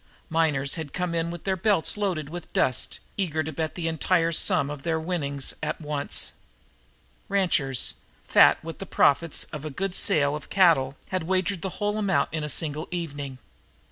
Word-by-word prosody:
Miners 150 -4 +1
had 145 -3 -8
come 180 -1 -2
in 165 0 0
with 170 -1 -7
their 190 -1 0
belts 190 -2 +2
loaded 185 -8 -1
with 175 +3 -8
dust, 130 - +1 0.2
eager 160 -5 0
to 160 - -5
bet 155 +1 -3
the 170 -2 -2
entire 165 +1 +1
sum 145 -3 +2
of 145 -1 -7
their 160 +1 -1
winnings 145 -5 -2
at 155 0 -3
once. 150 -2 -1 1.0
Ranchers, 160 - +2 0.3
fat - - +6
with 165 0 -7
the 195 - -7
profits 160 +1 +3
of 150 -2 -6
a 155 - -4
good 185 +6 -3
sale 145 -5 +3
of 150 - -8
cattle, 145 -8 +3
had 185 -3 -2
wagered 185 0 0
the 190 - -5
whole 210 0 -1
amount 200 -3 +1
of - - -20
it - - -1
in 155 - -3
a 150 - -3
single 155 +2 0
evening. 145 -6 -5
160 Hz, 185 wpm, -26 LUFS, 145-180 Hz, 1.0 s, fat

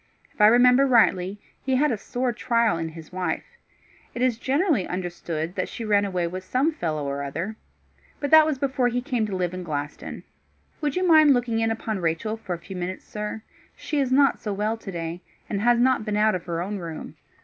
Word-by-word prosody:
If - - -6
I 210 - +9
remember 250 +4 +6
rightly, 205 -5 +3 0.2
he 265 -1 0
had 295 +3 +3
a - - +1
sore 245 +2 -2
trial 230 -6 +1
in 165 0 -3
his 160 -1 -11
wife. 185 0 -2 0.7
It 240 - -1
is 245 -3 +1
generally 280 - +1
understood 175 -2 -4
that - - -3
she 230 - -6
ran 205 -1 +3
away 180 -3 -1
with 185 +2 -5
some 260 - +1
fellow 155 - -3
or 140 0 -3
other. 165 +10 -4 0.6
But 285 -1 -3
that 315 -1 +8
was 305 -3 0
before 265 -2 +1
he 245 0 0
came 245 -4 -1
to 200 - -4
live 180 -1 -1
in 185 - -5
Glaston. 150 -3 -5 0.6
Would 295 -2 -1
you 365 0 +1
mind 310 -4 +7
looking 235 -2 0
in 225 0 +1
upon 225 -2 -3
Rachel 170 +6 -1
for 200 -5 -5
a - - -8
few 170 +3 -10
minutes, 180 +1 -5
sir? 210 +1 -5 0.3
She 300 - -3
is 265 -2 0
not 275 0 +4
so 210 - -4
well 210 +3 -1
to 220 -3 -8
day, 170 0 -5 0.3
and 200 -1 -2
has 240 +1 +4
not 255 -2 +3
been 210 -1 -2
out 215 +1 +3
of 180 -2 -4
her 170 -1 -2
own 200 +2 -4
room." 165 -3 -7
215 Hz, 215 wpm, -25 LUFS, 180-250 Hz, 0.7 s, I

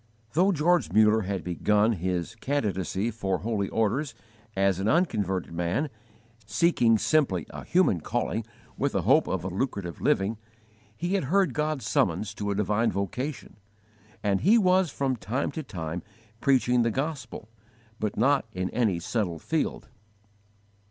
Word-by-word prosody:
Though 185 +6 +4
George 175 +1 +2
Muller 110 +1 +5
had 95 -3 -2
begun 105 +5 +2
his 90 0 -2
'candidacy 105 - -1
for 95 -4 -1
holy 100 -1 -2
orders' 120 +4 0 0.4
as 95 -1 +2
an 100 - -1
unconverted 105 - +1
man, 90 - -1 0.6
seeking 115 - +3
simply 105 - +1
a - - -8
human 175 - +2
calling 115 +3 -2 0.4
with - - 0
a - - +1
hope - - +4
of 95 -2 -2
a - - -3
lucrative 95 -4 -3
living, 105 +3 +1 0.6
he 175 +3 -2
had 195 -8 +1
heard 190 +6 +2
God's 150 -6 -1
summons 95 +1 +1
to 105 -1 -4
a 100 - 0
divine 105 +3 +1
vocation, 120 - -4 0.7
and 100 -2 +1
he 215 +6 +5
was 185 -4 +3
from 135 -2 -1
time 115 +9 -2
to 160 - -4
time 85 - -5 0.4
preaching 125 -2 +3
the 115 - +2
Gospel, 135 -4 -4 0.5
but 105 -1 -2
not 135 +4 +3
in 90 0 -2
any 110 -7 +1
settled 90 -3 -2
field. 160 -1 -2
110 Hz, 145 wpm, -27 LUFS, 95-140 Hz, 0.7 s, Muller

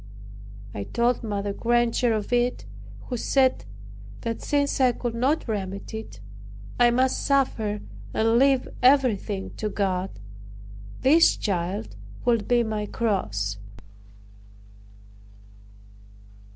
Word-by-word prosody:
I 100 - -4
told 240 +1 +1
Mother 205 -2 -2
Granger 240 +2 +1
of 215 +1 -2
it, 245 +1 +1 0.4
who 250 - -5
said 260 - +2 0.6
that 230 0 -3
since 285 -1 0
I 250 -2 +4
could 240 -1 -4
not 260 +7 0
remedy 200 0 -4
it, 105 - -11 0.6
I 240 0 +6
must 255 +2 +1
suffer 225 -7 0 0.3
and 225 +1 +2
leave 270 -1 +3
everything 240 -7 +2
to 215 - -2
God. 190 -2 -1 0.9
This 310 +6 +5
child 175 - -3 0.3
would 235 -3 +2
be 240 -1 +3
my 215 -2 -3
cross. 105 - -1
230 Hz, 105 wpm, -25 LUFS, 200-250 Hz, 0.9 s, I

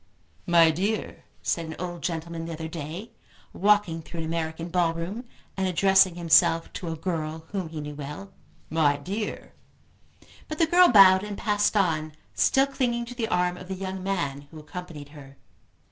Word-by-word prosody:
"My 170 -2 +6
dear," 200 +7 -3 0.2
said 170 -1 -1
an 160 - -6
old 175 -1 -5
gentleman 165 -1 -4
the 165 - -5
other 160 0 -5
day 165 +7 -7 0.4
walking 205 -5 +2
through 165 +1 -7
an - - -3
American 165 +1 -3
ball 170 -2 +1
room, 190 +9 -5 0.3
and 190 -1 0
addressing 190 0 +4
himself 165 -1 +3
to 175 - -6
a 160 - -3
girl 160 -1 -4
whom 190 -5 -3
he 160 -1 -6
knew 150 0 -6
well, 150 +7 -8 0.4
"My 150 -3 +3
dear 200 +8 -5 0.5
" - - -26
But 310 - -5
the 330 - +4
girl 355 +3 +6
bowed 195 - +7
and 205 -1 -6
passed 210 0 +1
on, 155 -5 0 0.2
still 270 0 +3
clinging 245 -3 -1
to 240 - -8
the 230 -2 -2
arm 180 -3 0
of 180 - -10
the 190 - -4
young 190 0 -5
man 145 -8 -3
who 160 - -12
accompanied 150 -1 -9
her. 140 -2 -14
175 Hz, 175 wpm, -26 LUFS, 160-195 Hz, 0.5 s, bowed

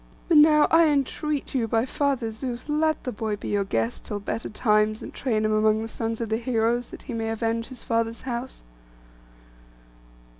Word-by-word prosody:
But 330 - +5
now 300 0 +7
I 330 0 +6
entreat 290 0 -1
you 245 -4 0
by 225 +2 +1
Father 265 -4 -1
Zeus, 240 +3 -5
let 310 +1 +1
the 250 - -3
boy 215 -1 -2
be 205 - -7
your 205 -1 +1
guest 115 -9 -2
till 205 - -4
better 215 +3 -4
times, 215 -1 +1
and - - -8
train 220 -5 0
him 215 - +1
among 215 0 +2
the - - -4
sons 225 0 -3
of 230 - -3
the 220 - +1
heroes, 235 0 0
that - - -10
he - - -6
may 225 -1 -2
avenge 225 +1 -1
his 260 -2 -10
father's 230 0 -1
house. 250 0 -5
230 Hz, 190 wpm, -25 LUFS, 220-265 Hz, -, now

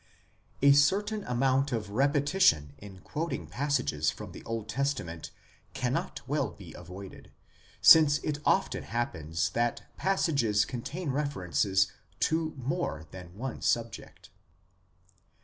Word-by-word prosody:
A 140 - +8
certain 205 +9 +2
amount 130 +3 +1
of 110 -4 -3
repetition 140 - +2
in 95 -2 -12
quoting 165 +9 -4
passages 80 - 0
from - - -7
the - - -11
Old 115 -2 -4
Testament 120 - -3 0.5
cannot 125 +1 -2
well 145 -1 0
be 90 -6 -12
avoided, 90 +3 -10 0.5
since 155 -2 +8
it 150 -1 -2
often 195 - +1
happens 80 -9 -2
that 120 0 -1
passages 140 - +2
contain 140 +6 -4
references 95 - +1 0.3
to 160 0 0
more 130 - -3
than 90 0 -11
one 130 +2 -5
subject. 115 -2 -2
125 Hz, 115 wpm, -29 LUFS, 95-145 Hz, 0.5 s, A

